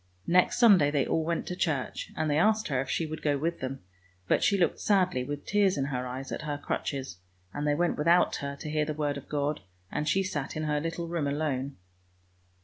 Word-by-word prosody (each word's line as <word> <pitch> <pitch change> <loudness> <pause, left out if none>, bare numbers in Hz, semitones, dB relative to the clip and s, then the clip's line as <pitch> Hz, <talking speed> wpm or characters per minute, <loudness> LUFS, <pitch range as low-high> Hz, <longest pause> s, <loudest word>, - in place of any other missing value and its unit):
Next 180 +1 +3
Sunday 200 - +6
they 145 -3 +1
all 160 - 0
went 170 +1 -1
to 180 - -4
church, 150 -8 -2
and 155 - 0
they 150 0 +2
asked 215 +2 +2
her 130 -3 +1
if 135 - -6
she 165 - 0
would 155 0 -6
go 145 -2 +1
with 165 +4 -2
them; 130 +1 -5 0.5
but - - +2
she 200 - +3
looked 175 - +1
sadly, 185 -10 +2
with 145 +2 -5
tears 200 -3 +2
in 135 - 0
her 125 0 -2
eyes, 130 +2 -6
at - - -3
her 150 -1 -3
crutches, 135 -8 -4 0.3
and 145 +1 -2
they 145 - +3
went 175 +2 +1
without 170 +4 +4
her 140 0 -4
to 155 - -5
hear 155 0 +1
the 150 0 -3
word 145 -1 -1
of 140 - -9
God, 145 0 -1 0.3
and 150 - -1
she 195 - +2
sat 150 -6 -3
in 155 - -2
her 150 -1 0
little 165 +1 -3
room 165 -4 -1
alone. 140 -2 -2
150 Hz, 230 wpm, -29 LUFS, 140-170 Hz, 0.5 s, Sunday